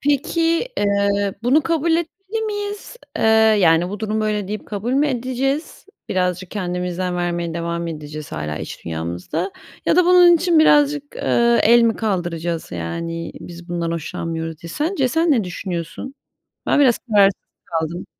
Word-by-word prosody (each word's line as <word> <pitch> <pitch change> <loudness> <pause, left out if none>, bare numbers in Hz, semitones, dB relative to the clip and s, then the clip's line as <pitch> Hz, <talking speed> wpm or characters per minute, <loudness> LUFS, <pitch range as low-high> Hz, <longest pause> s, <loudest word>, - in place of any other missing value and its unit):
Peki, 330 - +1
eee, 200 -1 +1
bunu 275 +6 +3
kabul 330 0 +1
etmeli 385 +6 -2
miyiz? 410 +2 -5 0.2
Eee, - - 0 0.4
yani, 165 0 +4
"Bu 205 +2 -6
durum 220 0 -1
böyle." 210 -2 -1
deyip 210 0 -5
kabul 215 +4 -3
mü 285 +3 +3
edeceğiz? 260 +6 -2 0.2
Birazcık 180 0 -1
kendimizden 180 -2 -3
vermeye 175 -1 -2
devam 170 0 -3
edeceğiz 150 - -7
hâlâ 75 -1 -4
iç - - -8
dünyamızda 85 - -4 0.3
ya - - +3
da 360 - +5
bunun 355 -1 +7
için 340 -1 +2
birazcık, 295 -1 +3
ııı, 235 0 +2
el 235 +2 +6
mi 230 -1 +2
kaldıracağız? 175 - -2
Yani, 165 - -4
"Biz 175 0 -11
bundan 170 -1 -2
hoşlanmıyoruz." 165 0 -4
diye. 170 - -8
Sence 295 - 0
sen 325 +4 +1
ne 230 -8 +3
düşünüyorsun? 180 +8 -5 0.5
Ben 290 - +3
biraz 250 -4 +4
kararsız 200 -5 +3 0.2
kaldım. 165 +1 -3
200 Hz, 150 wpm, -20 LUFS, 170-285 Hz, 0.5 s, bunun